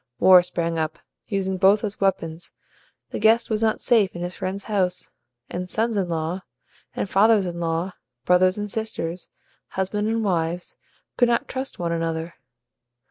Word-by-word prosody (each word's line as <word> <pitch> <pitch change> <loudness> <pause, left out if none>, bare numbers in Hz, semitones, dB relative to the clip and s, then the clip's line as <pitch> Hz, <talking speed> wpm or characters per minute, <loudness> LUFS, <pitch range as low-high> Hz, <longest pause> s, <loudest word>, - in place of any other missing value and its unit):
War 185 -1 +8
sprang 170 -2 -2
up, 155 0 -2 0.3
using 190 -2 -1
both 195 +3 +4
as 205 -2 -4
weapons; 170 -4 -1 0.6
the - - -3
guest 225 +2 +4
was 215 0 +1
not 220 -1 +2
safe 215 -7 +2
in 175 - -4
his 175 +1 -4
friend's 190 +2 -4
house; 190 -4 -1 0.4
and 180 +1 -5
sons 225 +3 0
in 190 -3 0
law 165 +3 -2 0.5
and - - -2
fathers 205 +1 +4
in 175 -1 -4
law, 165 +2 -1 0.3
brothers 185 +1 +4
and 210 -1 -4
sisters, 185 -6 -4 0.4
husbands 210 +3 -1
and 225 0 0
wives, 175 -2 -1 0.4
could 245 - +5
not 235 - +1
trust 265 +1 -4
one 170 -1 -2
another. 165 0 -2
185 Hz, 160 wpm, -24 LUFS, 170-210 Hz, 0.6 s, War